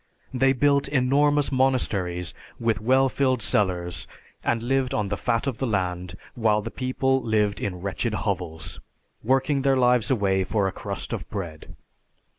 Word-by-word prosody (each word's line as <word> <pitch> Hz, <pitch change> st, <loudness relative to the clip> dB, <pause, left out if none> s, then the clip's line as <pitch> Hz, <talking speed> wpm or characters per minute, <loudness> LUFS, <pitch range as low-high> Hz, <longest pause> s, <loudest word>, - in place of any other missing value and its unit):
They 135 Hz, +1 st, +3 dB
built 140 Hz, +1 st, +2 dB
enormous 145 Hz, +2 st, +2 dB
monasteries 100 Hz, -10 st, +1 dB, 0.3 s
with 115 Hz, -4 st, 0 dB
well 130 Hz, +4 st, +4 dB
filled 130 Hz, -3 st, 0 dB
cellars, 90 Hz, -6 st, 0 dB, 0.4 s
and 115 Hz, -1 st, 0 dB
lived 130 Hz, +1 st, 0 dB
on 105 Hz, -2 st, -1 dB
the 100 Hz, -, -1 dB
fat 115 Hz, +5 st, -1 dB
of 135 Hz, -5 st, -3 dB
the 135 Hz, -, 0 dB
land, 90 Hz, -4 st, -2 dB, 0.2 s
while 110 Hz, -3 st, +1 dB
the 115 Hz, -, -5 dB
people 130 Hz, +1 st, 0 dB
lived 105 Hz, -3 st, 0 dB
in 90 Hz, -3 st, -3 dB
wretched 100 Hz, +4 st, -2 dB
hovels, 90 Hz, -7 st, -4 dB, 0.4 s
working 135 Hz, +4 st, +2 dB
their 135 Hz, -1 st, +3 dB
lives 125 Hz, -2 st, +3 dB
away 100 Hz, -6 st, +2 dB
for 100 Hz, 0 st, 0 dB
a -, -, -2 dB
crust 100 Hz, 0 st, -5 dB
of -, -, -5 dB
bread. 85 Hz, -6 st, -7 dB
115 Hz, 155 wpm, -25 LUFS, 95-130 Hz, 0.4 s, well